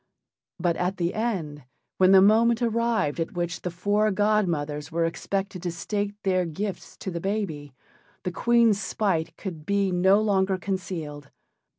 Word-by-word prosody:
But 175 -2 +1
at 180 +2 -1
the 175 -1 -1
end, 170 - -3 0.3
when 185 0 +6
the 190 -1 +8
moment 230 +3 +4
arrived 230 -9 0
at 165 - -2
which 175 -1 -3
the 180 - -3
four 205 +5 +1
godmothers 175 -8 0
were 165 +1 +1
expected 195 +2 -3
to 175 -1 -2
state 205 +4 -3
their 185 -2 +2
gifts 180 +3 -5
to 190 - -4
the 170 -1 -4
baby, 165 -9 -3 0.5
the 180 - -2
Queen's 230 +1 +3
spite 165 -6 -1
could 170 -6 -6
be 200 +2 +1
no 190 +3 +4
longer 195 -3 +1
concealed. 170 -7 -5
190 Hz, 155 wpm, -26 LUFS, 170-205 Hz, 0.5 s, the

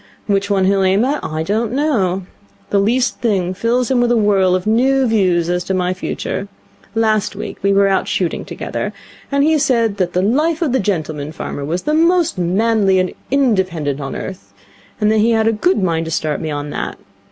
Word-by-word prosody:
Which 200 -1 0
one 195 -2 +2
he'll 195 0 +2
aim 190 +4 +3
at 290 +3 -1
I 155 +1 -3
don't 220 +6 -1
know. 200 - 0 0.5
The 200 - +3
least 240 +5 +1
thing 190 -6 0
fills 240 +6 0
him 250 -2 +3
with 240 0 +2
a 240 - +3
whirl 195 -4 +3
of 185 - -2
new 260 +5 +3
views 185 -7 +2
as 180 0 -1
to 190 - -1
my 180 0 0
future. 190 +1 -4 0.5
Last 220 -2 +1
week - - -6
we 200 - +2
were 200 0 +4
out 195 -1 +1
shooting 180 -3 -1
together, - - -5 0.4
and 280 0 +2
he 310 +1 +3
said 230 -6 +1
that 180 -2 -1
the 180 - +1
life 305 - +1
of 300 - 0
the 260 - +2
gentleman 155 -7 -2
farmer 145 -2 -6
was 170 +5 -2
the 300 - 0
most 335 - +2
manly 195 +2 +2
and 185 -1 0 0.2
independent 185 - 0
on 135 - -5
earth, 100 - -8 0.5
and 210 0 +2
that 220 - +2
he 230 +2 +3
had 220 0 +2
a - - +4
good 225 - +1
mind 165 -2 0
to 160 - -5
start 155 -1 -1
me 160 - -3
on 145 0 -4
that. - - -4
200 Hz, 210 wpm, -17 LUFS, 180-235 Hz, 0.5 s, were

